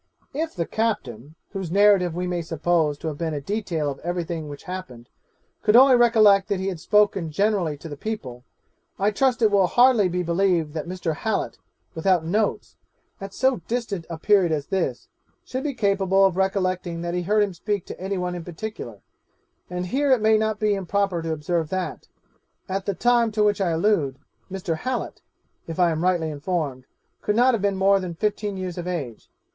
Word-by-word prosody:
'If 320 +3 -3
the 170 -3 -1
captain, 150 - -3 0.2
whose 190 -4 -4
narrative 195 -2 +4
we 180 +1 -2
may 180 -1 -2
suppose 160 -2 0
to 160 - -6
have 150 -2 -4
been 160 -2 -2
a - - -2
detail 165 -3 -2
of 135 - -9
every 175 +1 -2
thing 160 -2 -5
which 145 -1 -9
happened, 180 -11 -8 0.5
could 210 +1 +3
only 260 +1 +8
recollect 215 -5 +5
that 200 -3 -1
he 190 +1 -1
had 180 -4 -5
spoken 205 -3 +2
generally 185 -3 0
to 165 - -9
the 145 - -7
people, 135 - -6 0.5
I 200 +2 +2
trust 250 +2 +1
it 215 - +5
will 195 -2 +4
hardly 240 -3 +4
be 180 +1 -1
believed 170 -3 +1
that 160 +1 -4
Mr. 175 -3 -3
Hallet, 220 - -2 0.3
without 175 -1 +1
notes, 205 +5 -1 0.4
at 195 0 -6
so 260 +5 +1
distant 225 -8 -3
a 165 - -5
period 190 0 +3
as 150 -2 -1
this, 170 -10 -2 0.4
should 260 +1 -4
be 285 -3 -2
capable 195 -3 +3
of 190 -2 +2
recollecting 185 -3 -1
that 170 0 -3
he 180 - -1
heard 210 +4 +2
him 200 -2 -2
speak 200 +2 -3
to - - -9
any 195 +1 -2
one 180 0 -2
in 175 -1 -6
particular; 165 - -7 0.7
and 180 0 -3
here 275 +9 +1
it 255 - +5
may 220 +1 +4
not 215 -1 0
be 215 -1 +2
improper 195 -2 -1
to 165 0 -3
observe 160 +1 -1
that, 185 -1 -4 0.6
at 195 0 -3
the 200 - 0
time 240 0 +3
to 210 0 +2
which 205 -1 +2
I 185 - +2
allude, 160 -6 +1 0.3
Mr. 180 -4 -3
Hallet 255 +6 -4 0.5
(if 165 - -6
I 175 -2 +4
am 160 0 -2
rightly 175 -3 +1
informed) 145 -4 -3 0.4
could 210 - 0
not 250 +3 +4
have 225 - 0
been 200 -1 +1
more 195 +1 +4
than 180 -3 -5
fifteen 205 +1 -2
years 185 -2 -5
of 175 - -5
age. 145 -11 -5
185 Hz, 195 wpm, -24 LUFS, 165-210 Hz, 0.7 s, only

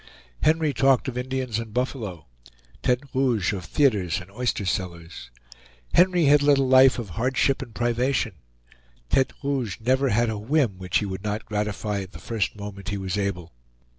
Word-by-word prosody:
Henry 155 -1 +2
talked 135 0 +3
of 125 - -7
Indians 125 -2 -2
and 115 -1 -8
buffalo; 110 - -3 0.6
Tete 125 +2 +1
Rouge 120 -8 +1
of 95 -2 -5
theaters 100 - +1
and 90 +2 -13
oyster 115 -2 -2
cellars. 85 -8 -4 0.6
Henry 180 -2 +4
had 145 +1 +6
led 145 -1 +4
a 135 - +2
life 130 0 +6
of 115 -5 -5
hardship 130 - +1
and 120 -5 -9
privation; 120 -1 0 0.8
Tete 130 - +2
Rouge 135 -8 -1
never 130 +4 +2
had 115 0 +2
a 105 - -4
whim 115 -4 0
which 90 -2 0
he 105 - -1
would 95 0 -5
not 105 0 -3
gratify 105 -1 -2
at 95 +1 -10
the - - -8
first 110 -4 -2
moment 100 -1 -7
he 100 - -2
was 95 -2 -3
able. 100 -4 -3
115 Hz, 170 wpm, -25 LUFS, 100-130 Hz, 0.8 s, had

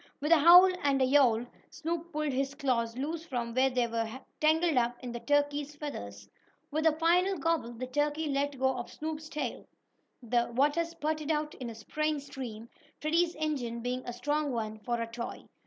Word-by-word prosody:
With 300 +3 -1
a 335 - +7
howl 350 +5 +9
and 280 -2 +2
a 260 - +4
yowl 255 -4 +4 0.2
Snoop 330 +2 -4
pulled 305 -2 -1
his 275 +1 -1
claws 240 -5 0
loose 315 +5 -3
from 245 -7 -3
where 260 +2 +3
they 250 -2 +1
were 230 +1 -3 0.2
tangled 315 +1 +3
up 240 -1 +1
in 245 - -4
the 240 - -5
turkey's 290 +3 0
feathers. 100 - -7 0.4
With 310 +2 +2
a 310 -1 +2
final 360 +4 +3
gobble, 310 -6 0
the 245 +2 -5
turkey 295 +4 -1
let 280 0 -1
go 265 0 +1
of 240 - -6
Snoop's 310 0 -5
tail. 290 -6 -4 0.6
The 240 0 +1
water 290 +6 +3
spurted 310 -2 -3
out 300 -1 0
in 250 -2 -6
a 230 - -8
spraying 305 +7 -2
stream, 245 -5 -7 0.3
Freddie's 335 +3 +1
engine 265 -7 -2
being 250 +1 -2
a 245 - -5
strong 290 +4 -1
one, 220 -2 -3
for 240 +2 -2
a 230 - -1
toy. 235 +1 -7
285 Hz, 190 wpm, -30 LUFS, 240-310 Hz, 0.6 s, howl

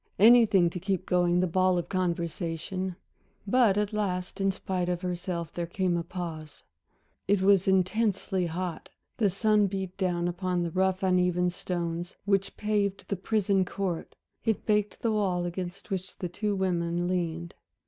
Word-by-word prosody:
Anything 210 -5 +6
to 180 - -5
keep 190 0 -2
going 175 0 +2
the - - +3
ball 185 +1 +2
of 175 - -2
conversation! 175 +1 -2 0.5
But 215 -2 +4
at 210 +1 0
last, 195 -2 -2
in 195 0 +3
spite 185 -2 -2
of 175 -1 -1
herself, 175 -2 -3
there 170 -1 -3
came 180 0 0
a 170 - 0
pause. 165 -4 -7 0.6
It 195 -1 +2
was 195 -1 +4
intensely 190 -1 +1
hot. 175 +1 -4 0.3
The 210 -4 +3
sun 210 +2 +3
beat 190 -1 -4
down 175 -2 0
upon 180 0 -1
the 170 - -3
rough 190 +1 +1
uneven 180 -1 +2
stones 175 -1 -4
which 195 -1 +1
paved 205 -2 -1
the 200 - 0
prison 195 0 +1
court, 185 -2 -4 0.3
it 225 -2 0
baked 210 -1 +1
the 230 - +1
wall 190 -5 0
against 175 +3 -6
which 185 -1 -4
the 180 - -4
two 205 +3 -1
women 175 -2 0
leaned. 170 -2 -2
185 Hz, 160 wpm, -28 LUFS, 175-195 Hz, 0.6 s, Anything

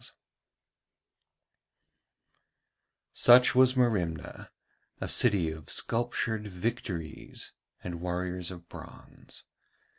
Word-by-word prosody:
Such 125 +1 +6
was 130 0 +4
Merimna, 90 - -1 0.5
a - - -4
city 100 -9 +3
of 80 -2 -10
sculptured 115 -2 -1
Victories 90 -4 -5 0.3
and 85 -2 -6
warriors 90 0 -3
of 85 -2 -11
bronze. - - -13
90 Hz, 70 wpm, -29 LUFS, 85-120 Hz, 0.5 s, Such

